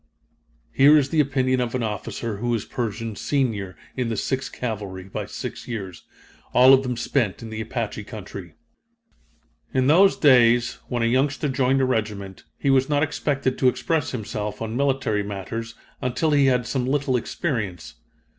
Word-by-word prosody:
Here 145 - +6
is 140 -2 +2
the 160 - +1
opinion 130 -3 +2
of 120 0 -2
an 125 - -1
officer 110 +1 -4
who 120 +4 -3
was 115 -3 0
Pershing's 115 -2 -4
senior 105 - -1 0.2
in 125 -3 -1
the 115 - -2
Sixth 130 -1 -2
Cavalry 100 -6 -5
by 95 - -6
six - - -7
years 95 -7 -6 0.5
all 130 +2 +8
of 135 - +6
them 125 -2 -3
spent 115 -6 -1
in 110 - -7
the 110 0 -4
Apache 110 -2 -4
country: 100 -6 -9 1.2
"In 130 -1 +3
those 180 +8 +5
days, 120 -4 +4
when 120 -2 -1
a - - +3
youngster 135 +5 +1
joined 135 0 +2
a - - +3
regiment, 105 -6 -3
he 140 - +1
was 135 +1 +3
not 145 0 +2
expected 140 -3 -1
to 130 - +4
express 155 +4 0
himself 105 -3 -4
on 115 0 -4
military 130 -6 +1
matters 105 +3 -5 0.3
until 130 +5 0
he 140 -2 +4
had 125 -2 +2
some 125 -1 -1
little 135 -1 +1
experience. 110 - -3
120 Hz, 165 wpm, -23 LUFS, 110-135 Hz, 1.2 s, all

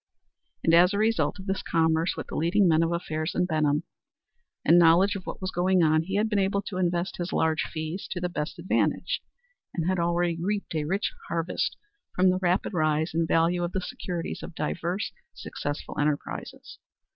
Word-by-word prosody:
And 165 - +3
as 180 +4 +6
a - - 0
result 220 +1 +1
of 190 - -9
this 190 -1 -1
commerce 160 +1 +1
with - - -4
the - - -8
leading 180 +5 +3
men 160 -1 +4
of 165 0 +1
affairs 155 -1 -2
in 180 - +2
Benham, 155 -3 +1 0.8
and 175 - +7
knowledge 175 +4 +5
of 190 - -7
what - - -5
was 185 0 -3
going 180 0 +2
on, 155 0 +4
he 190 +4 -4
had 210 +2 +2
been 210 -2 +1
able 200 +1 +1
to 195 - -5
invest 175 0 0
his 175 +1 -3
large 160 0 +1
fees 160 +4 -4
to 180 - -3
the 180 - -1
best 150 -3 -4
advantage, 175 +2 0 0.5
and 165 -1 -1
had 185 -1 +1
already 170 0 +1
reaped 200 +1 -2
a 155 -2 -1
rich 195 +7 -1 0.2
harvest 170 +1 -1 0.4
from 185 0 +4
the 185 - 0
rapid 180 +2 0
rise 155 -1 +1
in 165 0 +1
value 170 +2 +2
of 175 - -3
the 190 - 0
securities 180 -7 -5
of - - -9
diverse 170 +5 -2 0.2
successful 145 0 -5
enterprises. 145 0 -3
175 Hz, 190 wpm, -27 LUFS, 160-185 Hz, 0.8 s, and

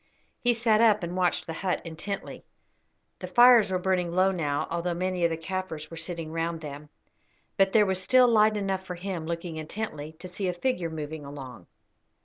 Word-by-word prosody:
He 245 -1 +2
sat 225 -1 +3
up 215 -4 +4
and 170 +1 -4
watched 180 -1 +1
the 165 - -5
hut 185 +2 -1
intently. 170 +5 -5 0.8
The - - -6
fires 240 -4 +7
were 185 - 0
burning 180 -1 0
low 185 +2 +3
now, 145 -6 -1
although 170 +1 -1
many 185 0 -1
of - - +3
the 165 - -3
Kaffirs 165 -3 -5
were - - -7
sitting 165 -1 -5
round 165 0 -2
them; 150 0 -8 0.7
but 195 -1 +3
there 210 0 +5
was 190 -1 0
still 255 +6 +5
light 215 -2 +4
enough 195 -2 -2
for 180 -1 -6
him, 175 -3 -5
looking 170 -1 -4
intently, 155 -2 -5
to 170 +3 -10
see 185 +2 -4
a 180 - 0
figure 180 -3 -1
moving 155 -1 -6
along. 135 -9 -9
180 Hz, 190 wpm, -27 LUFS, 160-195 Hz, 0.8 s, fires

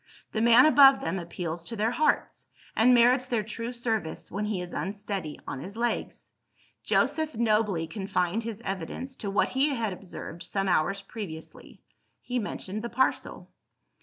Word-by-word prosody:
The 220 - -1
man 235 +3 +7
above 275 -3 +7
them 175 +4 -2
appeals 170 -1 -4
to 230 - -5
their 220 +2 +1
hearts, 300 +3 0 0.3
and 230 +3 +5
merits 250 +1 +5
their 235 -4 0
true 230 +3 -5
service, 225 -8 -3
when 205 +3 -2
he 210 -3 -2
is 180 0 -6
unsteady 195 -3 -4
on 135 - -5
his 200 +8 -8
legs. 240 0 -3 0.5
Joseph 315 -1 +1
nobly 210 -7 +2
confined 190 +2 -1
his 230 0 -6
evidence 195 +8 -4
to 205 - -4
what 195 - +2
he 270 +3 +2
had 225 -5 -1
observed 175 -2 -9
some 195 -1 -2
hours 190 +3 +1
previously: 195 -7 -9 0.4
he 250 0 -2
mentioned 205 -1 -4
the 235 - -4
parcel. 260 +3 -1
210 Hz, 160 wpm, -28 LUFS, 185-235 Hz, 0.5 s, man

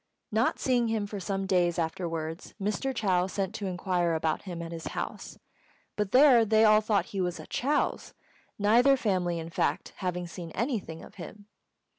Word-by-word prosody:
Not 220 +3 +1
seeing 245 -3 +1
him 220 -2 -1
for 205 0 -6
some 195 +1 -2
days 175 -2 +2
afterwards, 165 -1 -4
Mr. 210 +7 -1
Chou 185 -7 +1
sent 195 +1 -3
to 205 -3 -4
inquire 175 -2 0
about 160 -1 -1
him 175 -3 -7
at 165 - -7
his 165 -1 -6
house; - - -5 0.6
but 210 -2 -2
there 255 -3 +7
they 220 0 +4
all 215 0 +6
thought 210 -1 +1
he 195 - -1
was 180 -1 -2
at - - -11
Chou's, 290 +4 -1 0.4
neither 240 +7 +5
family, 185 -7 0
in 165 0 -6
fact, - - -1
having 180 -1 -3
seen 170 0 -8
anything 210 - -3
of - - -13
him. 205 +3 -10
195 Hz, 175 wpm, -28 LUFS, 175-220 Hz, 0.6 s, there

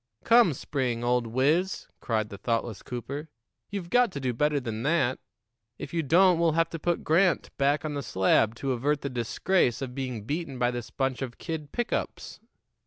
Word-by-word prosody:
"Come, 230 -7 +6
Spring, 125 -4 -2
old 120 -1 +1
wiz," 150 +11 +1
cried 110 -2 -1
the 100 - -8
thoughtless 115 -1 -2
Cooper, 140 +5 -6 0.4
"you've 195 -4 -5
got 245 -3 +4
to 140 - -4
do 130 -2 -1
better 150 +4 +1
than 115 -4 -4
that. 135 -2 +1 0.6
If - - -8
you 165 - +1
don't, 175 +4 +4
we'll 165 -2 +3
have 165 +1 +1
to 165 - -5
put 175 +2 -1
Grant 175 +3 +2
back 140 +3 +2
on 155 - -2
the 145 - -2
slab 110 0 +2
to 135 +3 -2
avert 140 +4 0
the 140 - -4
disgrace 125 +4 +1
of 130 -3 -5
being 125 -5 -4
beaten 145 +2 -4
by 125 0 +2
this 120 -2 -5
bunch 135 -1 -2
of 125 -3 -5
kid 160 -4 -5
pick 240 0 -2
ups." - - -4
140 Hz, 190 wpm, -27 LUFS, 120-165 Hz, 0.6 s, Come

